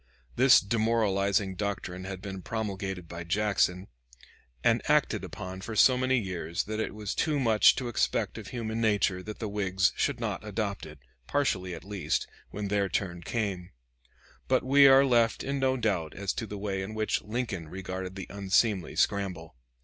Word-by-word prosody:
This 130 +1 +7
demoralizing 100 -3 +1
doctrine 95 -2 -4
had 95 0 -6
been 95 -2 -6
promulgated 95 -4 -4
by 85 +1 -7
Jackson, 95 0 +1 0.8
and - - +3
acted - - +2
upon 95 +1 -7
for 110 +3 -6
so 130 +4 +6
many 130 +1 +2
years 90 -6 -2
that 110 +1 -4
it 110 - -3
was 105 -2 -4
too 150 -3 0
much 115 -5 +5
to 130 -1 -3
expect 120 - -1
of - - -9
human 115 -2 -3
nature 105 -4 +2
that 105 +3 -7
the 110 - -4
Whigs 95 -2 +1
should - - 0
not - - -3
adopt - - -3
it, - - -12 0.3
partially 95 -11 0
at - - -10
least, 100 -6 -2 0.2
when 100 -1 -4
their 100 -1 +1
turn 85 -2 -2
came, 95 -3 -3 0.8
But 130 -1 +2
we 140 +2 +6
are 135 +1 +7
left 120 -3 +2
in 140 0 -2
no 130 0 +2
doubt 95 -9 -1
as 100 -1 -2
to 110 - -4
the 105 - -6
way 100 -1 -3
in 105 +3 -6
which 110 0 0
Lincoln 105 -7 -4
regarded 95 0 -6
the 95 - -6
unseemly 100 0 +1
scramble. 90 -7 -1
100 Hz, 170 wpm, -29 LUFS, 95-115 Hz, 0.8 s, This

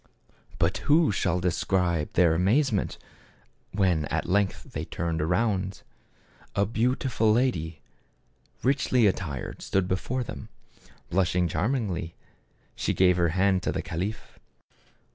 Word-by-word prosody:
But - - +1
who 155 -1 +5
shall 90 -2 0
describe 90 -2 0
their 85 -2 +4
amazement 105 - +1 0.7
when 90 -6 +1
at - - -2
length 100 +1 0
they - - -3
turned 85 -2 -3
around! 95 +3 0 0.7
A 100 - +3
beautiful 115 0 +1
lady, 85 - 0 0.8
richly 130 -2 +3
attired, 85 -9 -2
stood 95 -2 0
before 120 +8 -1
them. - - -8 0.6
Blush 90 -1 +1
ing 90 -1 +2
charmingly 95 - -2 0.6
she - - -1
gave 90 -1 +4
her 85 -1 +3
hand 95 +2 +2
to - - -1
the - - -3
caliph. 95 +6 -5
95 Hz, 120 wpm, -27 LUFS, 85-110 Hz, 0.8 s, who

